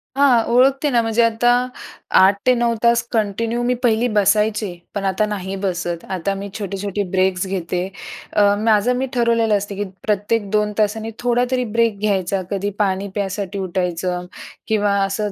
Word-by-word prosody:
हां. 260 Hz, -5 st, +4 dB
ओळखते 270 Hz, +3 st, +4 dB
ना 240 Hz, -3 st, +3 dB
म्हणजे 225 Hz, +1 st, +1 dB
आता 230 Hz, +1 st, +3 dB, 0.7 s
8-9 235 Hz, +5 st, +3 dB
तास 235 Hz, 0 st, +4 dB
कंटिन्यू 225 Hz, +2 st, -1 dB
मी 245 Hz, +1 st, +2 dB
पहिली 235 Hz, 0 st, +3 dB
बसायचे, 210 Hz, 0 st, +2 dB, 0.3 s
पण 195 Hz, -1 st, -2 dB
आता 195 Hz, +2 st, +1 dB
नाही 195 Hz, -2 st, -4 dB
बसत. 175 Hz, -2 st, -3 dB
आता 190 Hz, +1 st, -2 dB
मी 200 Hz, +1 st, -6 dB
छोटे-छोटे 200 Hz, 0 st, -3 dB
ब्रेक्स 185 Hz, 0 st, +1 dB
घेते. 180 Hz, -2 st, -2 dB, 0.5 s
अ, 205 Hz, -1 st, +4 dB
माझं 225 Hz, +2 st, +3 dB
मी 265 Hz, -, 0 dB
ठरवलेलं 230 Hz, -3 st, +2 dB
असतं, 200 Hz, 0 st, -5 dB
की 205 Hz, -, -2 dB, 0.2 s
प्रत्येक 205 Hz, 0 st, 0 dB
2 210 Hz, 0 st, +1 dB
तासांनी 220 Hz, +1 st, 0 dB
थोडातरी 245 Hz, +1 st, +1 dB
ब्रेक 225 Hz, -3 st, +2 dB
घ्यायचा. 195 Hz, -2 st, 0 dB
कधी 200 Hz, 0 st, -1 dB
पाणी 195 Hz, -1 st, 0 dB
प्यायसाठी 200 Hz, 0 st, -3 dB
उठायचं 180 Hz, -1 st, -2 dB, 0.4 s
किंवा 205 Hz, -2 st, +1 dB
असं 200 Hz, +1 st, -2 dB
205 Hz, 150 wpm, -20 LUFS, 195-230 Hz, 0.7 s, हां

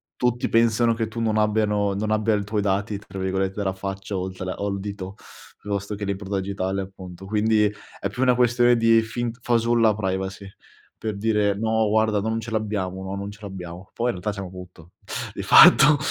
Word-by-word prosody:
tutti 125 Hz, -1 st, 0 dB
pensano 115 Hz, 0 st, +3 dB
che 115 Hz, -1 st, -2 dB
tu 115 Hz, +1 st, -7 dB
non 110 Hz, -1 st, 0 dB
abbiano 105 Hz, -1 st, +1 dB
non 105 Hz, +2 st, -2 dB
abbia 110 Hz, +1 st, +2 dB
il 105 Hz, -1 st, 0 dB
tuoi 105 Hz, +1 st, -1 dB
dati 100 Hz, +1 st, -1 dB
tra 95 Hz, -1 st, -9 dB
virgolette 95 Hz, 0 st, -1 dB
"della 100 Hz, -2 st, -1 dB
faccia" 95 Hz, +1 st, -5 dB
oltre 95 Hz, 0 st, -4 dB
o 100 Hz, -, -3 dB
al 100 Hz, -1 st, -2 dB
dito, 100 Hz, -1 st, -6 dB, 0.4 s
piuttosto 100 Hz, 0 st, -4 dB
che 100 Hz, 0 st, -5 dB
l'impronta 100 Hz, 0 st, -3 dB
digitale 95 Hz, 0 st, -2 dB
appunto. 95 Hz, -1 st, -10 dB
Quindi 105 Hz, +1 st, +2 dB, 0.3 s
è 100 Hz, -, -2 dB
più 115 Hz, +6 st, -5 dB
una 125 Hz, -1 st, +4 dB
questione 120 Hz, 0 st, +4 dB
di 115 Hz, 0 st, +5 dB
fint 115 Hz, +1 st, -4 dB
fasulla 115 Hz, -2 st, +3 dB
privacy, 95 Hz, -1 st, -3 dB, 0.5 s
per 110 Hz, -2 st, -4 dB
dire: 105 Hz, -1 st, +1 dB
"No, 110 Hz, 0 st, +1 dB
guarda 110 Hz, 0 st, +2 dB
non 110 Hz, +2 st, -1 dB
ce 115 Hz, +1 st, -7 dB
l'abbiamo, 100 Hz, -4 st, -2 dB
no, 95 Hz, +1 st, -5 dB
non 100 Hz, +1 st, -5 dB
ce 100 Hz, -, -14 dB
l'abbiamo". 90 Hz, -2 st, -8 dB
Poi 120 Hz, -, -1 dB
in -, -, +2 dB
realtà 105 Hz, +4 st, -2 dB
c'hanno 95 Hz, -2 st, -6 dB
tutto 90 Hz, -2 st, -12 dB, 0.4 s
di -, -, -5 dB
fatto, 150 Hz, +2 st, +8 dB
105 Hz, 190 wpm, -23 LUFS, 95-110 Hz, 0.5 s, fatto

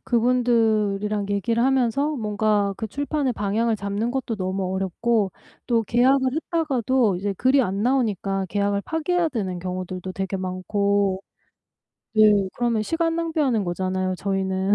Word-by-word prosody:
그분들이랑 220 Hz, -4 st, +1 dB
얘기를 230 Hz, +4 st, 0 dB
하면서 270 Hz, +3 st, +1 dB
뭔가 210 Hz, -3 st, 0 dB
그 220 Hz, -, -4 dB
출판의 285 Hz, +2 st, -1 dB
방향을 215 Hz, +3 st, 0 dB
잡는 200 Hz, +3 st, -2 dB
것도 255 Hz, -3 st, -2 dB
너무 190 Hz, -1 st, -2 dB
어렵고 195 Hz, +2 st, 0 dB, 0.4 s
또 230 Hz, -2 st, +3 dB
계약을 260 Hz, +4 st, +3 dB
했다가도 265 Hz, -, +1 dB
이제 200 Hz, +3 st, -2 dB
글이 260 Hz, +6 st, +3 dB
안 195 Hz, -1 st, -2 dB
나오니까 205 Hz, -6 st, 0 dB
계약을 200 Hz, +1 st, 0 dB
파기해야 330 Hz, +2 st, 0 dB
되는 190 Hz, -, -3 dB
경우들도 185 Hz, 0 st, -5 dB
되게 195 Hz, +1 st, -3 dB
많고 195 Hz, +1 st, 0 dB, 0.9 s
네 210 Hz, -2 st, +5 dB
그러면 235 Hz, -3 st, 0 dB
시간 330 Hz, +6 st, 0 dB
낭비하는 305 Hz, -10 st, 0 dB
거잖아요 185 Hz, +1 st, -1 dB
저희는. 190 Hz, 0 st, 0 dB
215 Hz, 325 characters per minute, -23 LUFS, 195-250 Hz, 0.9 s, 네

